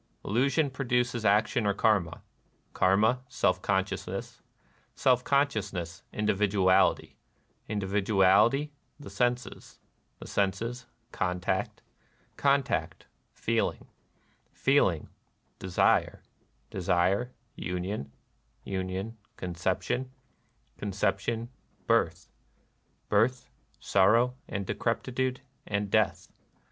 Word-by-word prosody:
Illusion 140 +6 +1
produces 125 -3 -1
action 105 +2 +3
or 100 - +1
Karma; 100 -7 +1 0.5
Karma, 110 +7 +3
self 90 -2 +1
consciousness; 95 0 -2 0.5
self 125 -1 +3
consciousness, 105 - -1
individuality; 100 -3 +2 0.5
individuality, 105 +6 +3 0.3
the 145 - -10
senses; 125 0 -2 0.4
the - - -11
senses, 115 +5 -2 0.2
contact; 90 +1 -2 0.5
contact, 140 -1 0 0.3
feeling; - - -1 0.7
feeling, 115 - +2 0.5
de 95 - -6
sire; 90 - +2 0.5
desire, 95 +8 +1 0.2
union; 90 -3 -4 0.5
union, 95 +4 -4 0.2
conception; 95 +8 -2 0.7
con 105 - -3
ception, 105 +4 -1 0.4
birth; - - +1 0.8
birth, 115 +5 +1 0.3
sorrow 115 +6 +3 0.2
and 100 -1 -3
decrepitude 125 +5 -1 0.3
and 100 -1 -2
death. 110 -3 +1
105 Hz, 80 wpm, -29 LUFS, 95-125 Hz, 0.8 s, action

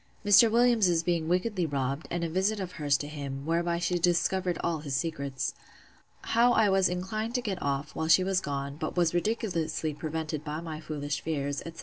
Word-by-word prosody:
Mr. 215 +3 +7
Williams's 220 -8 +3
being 170 -2 0
wickedly 185 +2 0
robbed, 140 -1 -2
and 175 0 -2
a - - 0
visit 190 +5 0
of 185 -2 -4
hers 145 -5 +1
to 145 - -5
him; 140 -2 -6
whereby 170 +1 0
she 175 +1 0
discovered 180 +1 +1
all 170 -2 0
his 145 -3 -4
secrets. 140 -4 -2 0.7
How 240 +1 +3
I 220 -3 +4
was 190 -1 +3
inclined 215 +6 -3
to 250 - +1
get 195 -5 -3
off, 140 +1 -2
while 160 - -2
she 185 +3 +6
was 190 0 +1
gone; 140 -1 -4
but 155 +3 -4
was 175 -2 +3
ridiculously 175 -5 -1
prevented 155 0 -4
by 150 0 -4
my 160 -2 -6
foolish 145 -2 -4
fears, 145 -3 -2
etc. 165 0 -9
170 Hz, 195 wpm, -29 LUFS, 150-190 Hz, 0.7 s, Mr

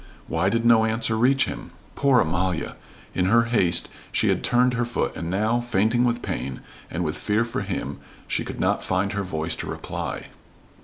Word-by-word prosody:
Why 85 +4 +1
did 115 +2 0
no 115 -1 +6
answer 110 0 0
reach 130 +4 +4
him? - - -6 0.2
Poor 135 -3 +4
Amalia! 85 +1 -1 0.4
In 90 - +1
her 115 +5 +5
haste 100 -8 +2 0.2
she - - +2
had - - +1
turned 125 +1 +3
her 120 0 0
foot 120 0 -2
and 85 - -4
now, 110 +6 +1
fainting 120 +1 +2
with 120 0 0
pain, 65 +1 -4 0.3
and 85 +2 -2
with 75 -1 -2
fear 110 +2 +1
for 120 +3 -3
him, 100 -2 -4 0.3
she - - -1
could - - -7
not - - +1
find 95 +2 0
her 100 - -1
voice 80 -4 -2
to - - -5
reply. - - -5
110 Hz, 190 wpm, -24 LUFS, 90-120 Hz, 0.4 s, no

